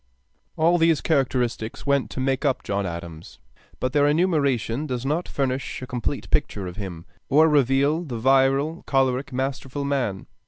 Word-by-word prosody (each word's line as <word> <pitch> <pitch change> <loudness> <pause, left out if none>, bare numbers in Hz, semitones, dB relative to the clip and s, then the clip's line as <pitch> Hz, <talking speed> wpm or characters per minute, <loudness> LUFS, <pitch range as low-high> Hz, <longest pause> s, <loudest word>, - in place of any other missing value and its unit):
] - - -43
All 170 +2 +3
these 165 -2 +4
characteristics 125 -6 -1
went 140 -2 +1
to - - -6
make 135 +1 0
up 140 -3 0
John 100 -1 -2
Adams; 85 -1 -8 0.4
but 130 +1 -2
their 145 -1 +4
enumeration 145 - +1
does 125 -2 -3
not 155 +5 -1
furnish 135 -1 -2
a - - -3
complete 125 -2 -3
picture 100 - 0
of 90 +1 -7
him, 90 -5 -6 0.2
or 155 +4 +6
reveal 145 +2 +2
the 130 -8 -5
virile, 135 +6 +2
choleric, 135 0 +1
masterful 135 +1 -3
man. 130 -9 -1
135 Hz, 160 wpm, -24 LUFS, 120-145 Hz, 0.4 s, or